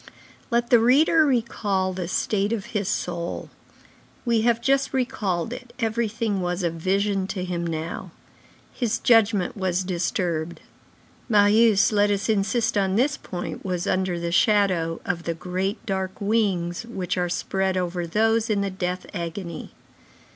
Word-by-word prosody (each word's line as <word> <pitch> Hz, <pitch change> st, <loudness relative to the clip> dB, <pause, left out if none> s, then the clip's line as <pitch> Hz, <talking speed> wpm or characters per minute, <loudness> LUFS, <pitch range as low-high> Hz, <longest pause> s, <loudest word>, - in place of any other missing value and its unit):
Let 235 Hz, -1 st, 0 dB
the 240 Hz, -, +7 dB
reader 300 Hz, +7 st, +5 dB
recall 205 Hz, -7 st, 0 dB
the 180 Hz, -2 st, -4 dB
state 200 Hz, +3 st, 0 dB
of 215 Hz, -4 st, -2 dB
his 205 Hz, -3 st, -1 dB
soul. 175 Hz, -4 st, -3 dB, 0.7 s
We 235 Hz, -2 st, +2 dB
have 235 Hz, 0 st, +2 dB
just 270 Hz, +3 st, +1 dB
recalled 215 Hz, -6 st, -1 dB
it, 245 Hz, -1 st, -10 dB
everything 225 Hz, -3 st, -1 dB
was 180 Hz, +1 st, -2 dB
a 170 Hz, -, +1 dB
vision 195 Hz, +3 st, 0 dB
to 190 Hz, -2 st, -3 dB
him 170 Hz, -1 st, -3 dB
now. 160 Hz, 0 st, -4 dB, 0.6 s
His 235 Hz, -3 st, -1 dB
judgment 220 Hz, -5 st, +3 dB
was 185 Hz, -2 st, 0 dB
disturbed. 170 Hz, -2 st, -2 dB, 0.7 s
Marius, 210 Hz, 0 st, +5 dB
let 205 Hz, -1 st, +3 dB
us 200 Hz, +1 st, -1 dB
insist 220 Hz, +1 st, +1 dB
on 190 Hz, -1 st, +1 dB
this 270 Hz, +6 st, +2 dB
point, 180 Hz, -8 st, -6 dB
was 180 Hz, -2 st, -2 dB
under 185 Hz, -2 st, 0 dB
the 170 Hz, 0 st, -3 dB
shadow 185 Hz, -4 st, +2 dB
of 175 Hz, -1 st, -2 dB
the 170 Hz, -, -2 dB
great, 185 Hz, +6 st, -3 dB
dark 190 Hz, -2 st, -3 dB
wings 200 Hz, -5 st, 0 dB
which 190 Hz, -6 st, -3 dB
are 180 Hz, -1 st, 0 dB
spread 190 Hz, +1 st, -1 dB
over 175 Hz, -1 st, -2 dB
those 225 Hz, +5 st, +2 dB
in 205 Hz, -2 st, +1 dB
the 200 Hz, -1 st, -1 dB
death 180 Hz, -1 st, -3 dB
agony. 170 Hz, -1 st, -5 dB
195 Hz, 145 wpm, -24 LUFS, 180-225 Hz, 0.7 s, the